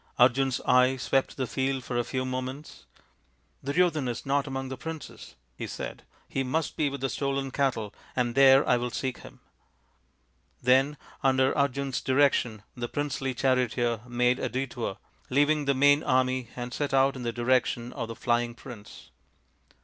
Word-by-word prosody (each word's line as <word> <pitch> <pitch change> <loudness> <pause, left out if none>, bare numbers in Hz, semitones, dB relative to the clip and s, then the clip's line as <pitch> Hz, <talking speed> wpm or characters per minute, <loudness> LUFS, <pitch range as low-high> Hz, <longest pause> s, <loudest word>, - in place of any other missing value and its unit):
Arjun's 130 +1 +4
keen - - -12
eye 125 +1 +4
swept 135 +1 0
the 130 - -1
field 130 +1 -1
for 125 - -5
a 120 - +2
few 130 +1 -3
moments. 130 +3 -6 0.4
" 60 -1 -40
Duryodhan 155 -1 +1
is 120 - -5
not 140 +1 +1
among 135 0 -4
the 130 - -4
princes," 160 +3 -8 0.2
he - - -5
said, - - -7
" - - -34
he 135 - -2
must 145 +5 -1
be 150 -2 +1
with 140 -1 -6
the 135 - +1
stolen 140 0 -2
cattle, 125 -7 -1 0.2
and 120 -2 0
there 135 0 +6
I 125 - +4
will 120 +1 -2
seek 130 +1 -3
him." - - -14 1.2
Then, 135 +4 +3 0.2
under 130 0 +3
Arjun's 140 -1 0
direction, 130 -5 +2
the 120 -1 -4
princely 135 -3 -2
charioteer 120 -3 +1
made 125 +1 +2
a - - -2
detour, 125 -4 -3 0.3
leaving 145 +2 +2
the 140 0 +2
main 145 +2 +5
army, 130 -2 +1
and 125 0 -5
set 145 0 -1
out 135 +1 +4
in 130 - -6
the 120 -1 -2
direction 120 0 0
of 115 - -4
the 115 - -7
flying 120 0 0
prince. 115 -4 -12
130 Hz, 170 wpm, -28 LUFS, 120-135 Hz, 1.2 s, there